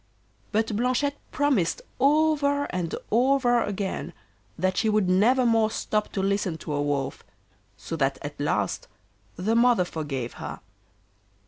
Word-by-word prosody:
But 220 0 0
Blanchette 255 +5 0
promised 270 - +1 0.2
over 285 0 +3
and 175 -3 -2 0.2
over 245 0 +3
again 200 -2 -3 0.4
that 185 0 0
she 220 - +2
would 210 -3 +2
never 230 +8 +4
more 225 -2 +3
stop 215 -1 -2
to 190 - -1
listen 195 -4 0
to 150 - -5
a 145 - 0
Wolf, 145 -2 -2 0.5
so 165 - -5
that 135 -2 +1
at 145 0 -7
last 145 - -1 0.5
the 210 +6 0
mother 235 -5 +4
forgave 140 -8 -4
her. - - -6
215 Hz, 135 wpm, -26 LUFS, 175-250 Hz, 0.5 s, never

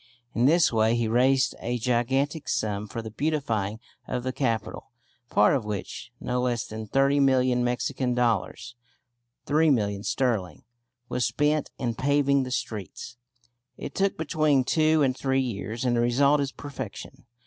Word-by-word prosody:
In 120 +2 +3
this 165 -3 +4
way 110 +1 +3
he 120 -1 0
raised 130 +3 +3
a 120 +1 -2
gigantic 130 +5 0
sum 105 -3 -1
for 115 +3 -6
the 110 - -7
beautifying 115 -7 -1 0.3
of 125 -1 -3
the 130 0 -2
capital, 115 -5 -2 0.4
part 105 - +4
of 130 - -1
which, 105 -2 -6
no 125 0 -2
less 120 -2 -1
than 110 0 -7
thirty 135 +5 +2
million 130 -2 +3
Mexican 125 +1 -1
dollars 120 0 -1 0.7
(£3,000,000 125 -10 +2
sterling), 105 - -1 0.4
was 125 - 0
spent 150 +1 0
in 120 -2 -2
paving 140 +2 +2
the 130 - -4
streets. 115 0 -5 0.6
It - - -7
took 195 0 0
between 155 -3 +2
two 155 +2 +3
and 130 -2 +1
three 135 0 0
years, 115 -1 -3
and 120 -1 +2
the 120 - +2
result 140 +5 +3
is 140 -1 -2
perfection. 140 -4 -8
125 Hz, 150 wpm, -26 LUFS, 115-140 Hz, 0.7 s, this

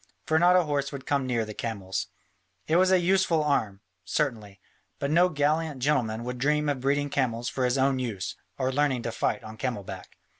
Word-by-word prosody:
For 160 0 +2
not 175 +1 +5
a 180 - +5
horse 145 -3 -1
would 135 -2 -7
come 140 -2 0
near 120 -3 0
the 110 - -7
camels. 100 -4 -3 0.6
It 160 - +2
was 185 +1 +4
a 190 - +6
useful 175 -3 +2
arm, 110 -9 0 0.2
certainly, 110 -10 -2 0.4
but 140 - -2
no 175 +3 +5
gallant 150 -1 0
gentleman 125 -5 0
would 125 +1 -5
dream 150 +2 +1
of 140 -2 -1
breeding 145 +1 0
camels 120 -4 0
for 130 - -1
his 125 +2 +1
own 135 0 +2
use 110 -7 -3 0.2
or 130 -1 -1
learning 135 -3 +1
to 115 - -2
fight - - -1
on 110 0 -9
camel 120 -5 -3
back. - - -9
135 Hz, 200 wpm, -27 LUFS, 115-150 Hz, 0.6 s, a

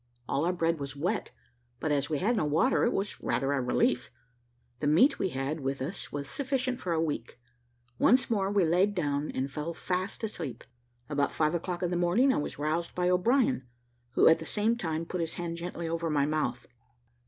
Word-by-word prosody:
All 145 +4 0
our 175 - +2
bread 165 -2 0
was 140 0 -5
wet, 180 +9 -1 0.5
but 155 - -1
as 145 0 +1
we 155 - 0
had 220 +10 +1
no 205 - +1
water, 160 - +3
it 240 - +2
was 200 -1 -3
rather 135 +1 0
a 140 - +1
relief; 125 0 +1 0.7
the 145 - -1
meat 200 - +5
we 190 - +1
had 135 +2 -3
with 135 0 -2
us 140 +9 -4
was 140 -1 -4
sufficient 260 - -1
for 180 - -3
a 165 - +1
week. 145 -7 -3 0.6
Once 250 +4 +5
more 200 -5 +1
we 200 -3 +3
laid 185 +5 +2
down 145 -3 -1
and 135 +1 -2
fell 155 +3 -4
fast 185 +5 -3
asleep. 160 - -5 0.4
About 145 -1 0
five 155 0 +1
o'clock 175 +1 -2
in 175 - 0
the 175 - 0
morning 200 +11 +3
I - - 0
was 150 - -3
roused 155 +4 -2
by 180 0 +2
O'Brien, 185 - +2 0.5
who - - +5
at 165 - +6
the 160 - -7
same 220 +2 +1
time 165 -6 -2
put 180 +1 -3
his 165 -1 -2
hand 170 -1 -4
gently 170 0 -4
over 165 0 -1
my 145 -2 +2
mouth. 145 -5 -1
165 Hz, 205 wpm, -29 LUFS, 145-190 Hz, 0.7 s, at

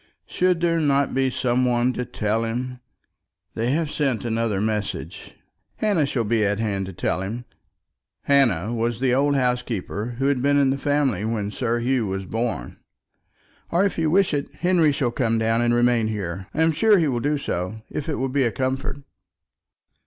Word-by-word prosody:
Should 180 -2 +1
there 165 -1 +2
not 140 -2 +2
be 135 0 +2
some 125 0 0
one 125 0 +2
to 125 - -3
tell 115 -2 -1
him? 125 +2 -3 0.7
They 115 +1 -1
have 155 -1 -1
sent 135 -6 -1
another 115 -3 0
message." 105 -1 -3 0.4
"Hannah 195 -9 +1
shall 125 -4 -1
be 110 0 +1
at 105 0 +1
hand 100 -3 -2
to 95 - -7
tell 90 - -1
him." 115 +6 -5 0.8
Hannah 120 -8 +2
was 115 0 -1
the 130 -1 +2
old 140 +2 +2
housekeeper 125 -3 -2
who 135 - -1
had 140 -3 +2
been 145 +1 +3
in 140 -2 +4
the 140 - -2
family 140 -8 +1
when 110 -2 -2
Sir 120 +1 -1
Hugh 125 -2 +1
was 95 0 -3
born. 115 - -3 0.9
"Or, 175 +4 +2
if 200 - -1
you 160 -1 +2
wish 190 +1 +3
it, 145 -1 -2
Henry 175 -4 +3
shall 135 -4 0
come 115 -2 0
down 115 +1 +1
and 120 0 +2
remain 120 -1 +3
here. 95 -3 -4
I 160 - +1
am 165 - +4
sure 215 +6 +4
he 165 -4 +2
will 125 -4 0
do 145 +4 0
so, 110 -4 -4
if 150 - -4
it 150 - 0
will 135 - -1
be 135 +1 +1
a 120 - +1
comfort." 130 +2 -3
125 Hz, 190 wpm, -23 LUFS, 110-140 Hz, 0.9 s, in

